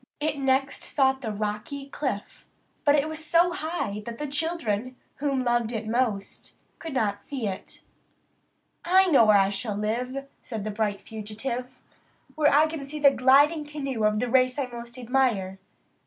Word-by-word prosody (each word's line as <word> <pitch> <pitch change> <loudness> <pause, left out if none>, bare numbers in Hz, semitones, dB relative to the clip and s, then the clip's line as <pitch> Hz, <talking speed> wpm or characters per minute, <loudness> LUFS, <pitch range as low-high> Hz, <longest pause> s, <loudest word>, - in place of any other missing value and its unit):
It 300 -1 -1
next 270 0 +1
sought 265 -2 +2
the 225 -4 -3
rocky 215 +7 -4
cliff; 260 -7 -5 0.4
but 290 - +5
there 295 - +4
it - - -4
was 315 0 -6
so 340 +2 +3
high 315 - -3
that 230 -1 -5
the 295 - -3
children, 275 -6 -2 0.2
whom 275 -2 0
it - - -4
loved 235 -2 0
most, 220 -4 -2 0.2
could 320 -4 -6
not 205 -4 0
see 255 -1 -4
it. 190 -1 -7 1.0
"I 375 +2 +5
know 250 -6 +7
where 210 -1 +6
I 195 0 +3
shall 205 +1 -3
live," 250 +6 -2 0.2
said 220 -5 -5
the 215 - -3
bright 205 -1 -1
fugitive 235 +4 -5 0.6
"where 305 -2 +3
I 295 +2 +6
can 315 -2 -5
see 285 +2 -6
the 285 -1 +7
gliding 285 +5 +4
canoe 275 -6 -4
of 210 0 +2
the 245 - 0
race 255 +1 +3
I 280 - 0
most 235 0 -9
admire. 235 -7 0
255 Hz, 170 wpm, -26 LUFS, 215-285 Hz, 1.0 s, know